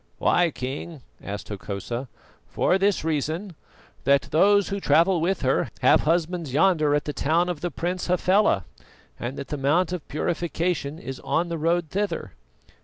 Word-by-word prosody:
"Why, 175 -1 +3
King?" 135 +2 -6 0.2
asked 100 0 -6
Hokosa. 105 +5 -5 0.4
"For 190 - +1
this 200 -3 +2
reason 160 +5 -2 0.5
that 140 +1 +3
those 200 +5 +4
who 200 0 -2
travel 170 -1 +3
with 180 +1 0
her 130 +1 +1
have - - +5
husbands 165 -1 0
yonder 155 -2 +3
at 145 - -1
the 150 - -3
town 165 +6 +1
of 170 -4 -4
the 175 - -1
Prince 175 +4 -3
Hafela, 180 - +2 0.5
and 120 +3 -4
the 140 +1 -5
Mount 160 +6 +1
of 175 -5 -5
Purification 165 -1 -2
is 130 -3 -7
on 170 +1 -1
the 170 - -2
road 165 0 0
thither. 205 +1 -2
165 Hz, 155 wpm, -25 LUFS, 140-180 Hz, 0.5 s, have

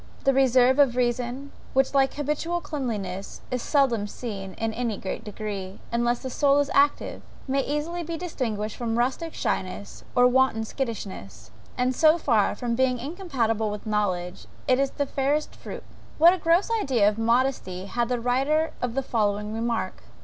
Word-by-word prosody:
The 275 - +4
reserve 260 0 +4
of 270 -4 +5
reason, 250 +3 -1 0.2
which 270 +1 +2
like 270 -1 +3
habitual 300 +4 -1
cleanliness, 210 - -4
is 250 -1 -1
seldom 240 -8 +2
seen 200 -4 -6
in 225 0 -2
any 230 -3 -2
great 195 - -5
degree, 200 -3 -5
unless 240 +1 0
the 260 - -3
soul 280 +1 +3
is 285 0 +1
active, 285 +1 +2 0.3
may 275 +1 +1
easily 300 +5 -2
be 335 0 -4
distinguished 225 - -3
from 230 -1 -1
rustic 265 +7 -1
shyness 185 +2 -3
or 245 - +6
wanton 250 -3 +3
skittishness; 205 - -6 0.3
and 250 +1 +1
so 315 +3 +5
far 225 -11 +2
from 235 +2 -2
being 255 +1 +2
incompatible 245 - -1
with 210 +1 -6
knowledge, 185 -5 -1 0.2
it 255 0 +4
is 275 0 +1
its 285 - -1
fairest 285 +3 0
fruit. - - -8 0.3
What 335 +3 +7
a 375 - -3
gross 340 +7 +2
idea 240 - +3
of 210 +1 +1
modesty 230 -6 +1
had 235 +3 -1
the 250 -1 0
writer 275 +7 +1
of 245 -1 -2
the 270 - 0
following 210 -3 0
remark! 225 -4 -2
245 Hz, 165 wpm, -26 LUFS, 220-275 Hz, 0.3 s, What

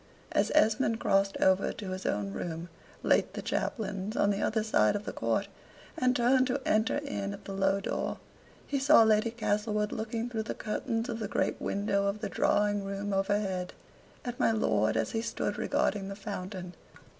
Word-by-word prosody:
As - - +2
Esmond 225 -4 +3
crossed 195 0 +2
over 190 0 +3
to 195 -4 -6
his 185 0 -4
own 100 -1 -1
room, 165 - -5 0.3
late - - +2
the - - -3
chaplain's, 205 -3 -2
on 200 - +3
the 200 - -1
other 220 -1 +1
side 110 - +3
of 205 +1 -3
the - - -4
court, - - 0 0.5
and 255 0 +2
turned 255 +1 +4
to 265 +2 0
enter 220 +4 +2
in 280 -9 -3
at 200 - -11
the 195 - -5
low 195 0 +2
door, 195 - -2 0.5
he 280 - -1
saw 275 -3 +7
Lady 220 +1 +3
Castlewood 210 -2 -1
looking 225 +1 -3
through 230 -2 -2
the 215 - -4
curtains 225 +2 -2
of 225 -1 -4
the 215 - -2
great - - -1
window 200 0 0
of 200 +2 -1
the 210 -2 -3
drawing 205 0 +2
room 200 +1 -3
overhead, 195 -2 0 0.5
at 245 +1 -4
my - - +4
lord 110 - +2
as 110 -1 0
he 225 - -1
stood 230 - -3
regarding 195 -2 0
the 195 - -5
fountain. 185 -3 -6
205 Hz, 185 wpm, -30 LUFS, 195-225 Hz, 0.5 s, saw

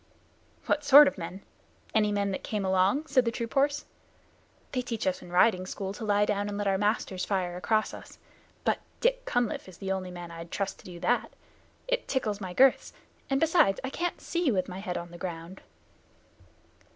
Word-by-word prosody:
"What 300 - +1
sort 290 +1 +9
of 280 - -2
men? 180 +3 -7 0.5
Any 210 -1 +3
men 200 -1 0
that 190 - -4
came 210 -3 -2
along?" 190 +10 +2
said 270 -4 +3
the 230 - +1
troop 230 0 -5
horse. 285 +2 +2 0.9
"They 255 - 0
teach 235 -3 -4
us 185 - 0
in 175 - -12
riding 185 0 +3
school 195 0 -4
to 220 - -8
lie 205 -1 +3
down 205 0 -1
and 200 - -4
let 205 - -2
our 195 -1 +2
masters 205 -3 0
fire 185 -3 -1
across 215 +4 0
us, - - -11 0.5
but - - +1 0.2
Dick - - +1
Cunliffe 240 -5 -1
is 180 - -13
the 195 -1 -4
only 190 -1 -2
man 175 -1 -8
I'd 165 0 -8
trust 200 +2 -3
to - - -17
do 175 -2 -9
that. 245 - +1 0.6
It - - -1
tickles 215 -6 -1
my 185 -2 -5
girths, 260 +7 +4 0.4
and, 270 0 +2
besides, 320 - +4
I 260 - -3
can't 350 +4 -2
see 340 -5 0
with 185 -4 0
my 185 0 -6
head 185 -3 -3
on 170 0 -7
the 175 - -11
ground." 175 +1 -6
205 Hz, 200 wpm, -28 LUFS, 185-250 Hz, 0.9 s, sort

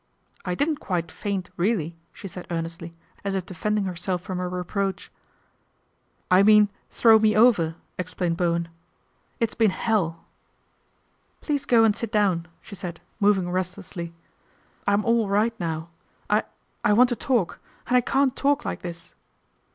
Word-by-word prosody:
' - - -32
I - - 0
didn't 295 - 0
quite 175 - -2
faint, 195 -3 -4
really," 175 -4 0 0.2
she 195 - -9
said 180 -1 -9
earnestly, 165 0 -5 0.3
as 200 -1 -1
if 190 -2 -2
defending 210 +3 -1
herself 180 -1 -3
from 185 -2 -4
a 180 - -2
reproach. 190 +2 -3 0.6
" - - -31
I 185 +1 +7
mean 210 0 +6 0.2
throw 225 -2 +6
me 215 -1 +3
over," 210 -8 +4 0.2
explained 180 -1 -1
Bowen, 170 -1 0 0.7
"It's 230 -2 0
been 225 -2 +3
hell!" 185 -6 -1 0.6
" - - -42
Please 290 -3 -1
go 230 -2 +5
and 215 -2 +4
sit 230 -2 -4
down," 190 -6 +2 0.2
she - - -12
said, 175 -4 -6 0.2
moving 195 -4 +3
restlessly. 180 -1 -4 0.8
"I'm 200 +1 +2
all 230 -3 +2
right 210 +3 +2
now. 165 -1 -3 0.4
I - - +3 0.4
I 210 - +4
want 245 +3 +6
to 240 - 0
talk 235 -7 0 0.3
and 250 - +1
I 250 - +6
can't 270 +1 +1
talk 285 0 +1
like - - -3
this." 170 -1 -8
195 Hz, 160 wpm, -25 LUFS, 175-220 Hz, 0.8 s, I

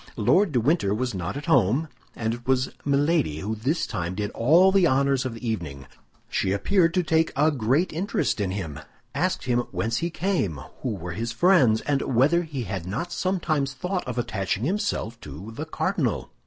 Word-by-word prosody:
Lord 180 - +3
de 125 - +2
Winter 120 - +2
was 125 +1 -2
not 95 +6 -4
at 145 - -6
home; 155 - +3 0.3
and 110 -1 -1
it 120 +1 -9
was 130 0 +1
Milady 145 - +1
who 105 +3 -2
this 130 +10 -1
time 90 -4 -3
did 105 +1 -3
all 165 +11 +5
the 190 -3 +4
honors 135 -1 +2
of 120 - -6
the 115 +1 -6
evening. 75 -11 -4 0.4
She 95 - 0
appeared 170 - +2
to 180 - +3
take 160 0 +2
a 150 +3 +3
great 140 +7 +1
interest 175 - -1
in 100 - 0
him, 85 -7 -4 0.3
asked 175 +6 0
him 125 -2 +1
whence 115 +1 -1
he 170 - -1
came, 165 - -1 0.2
who 120 -5 -2
were 90 -1 -6
his 115 +5 -3
friends, 150 - +4
and 140 -2 0
whether 150 +8 +4
he 150 -7 -5
had 95 -4 -5
not 165 - -3
sometimes 155 -7 -1
thought 180 +3 -3
of 125 -1 -4
attaching 100 -3 -2
himself 165 - -2
to 75 +10 -9
the 110 - -5
cardinal. - - -1
130 Hz, 190 wpm, -25 LUFS, 105-165 Hz, 0.4 s, all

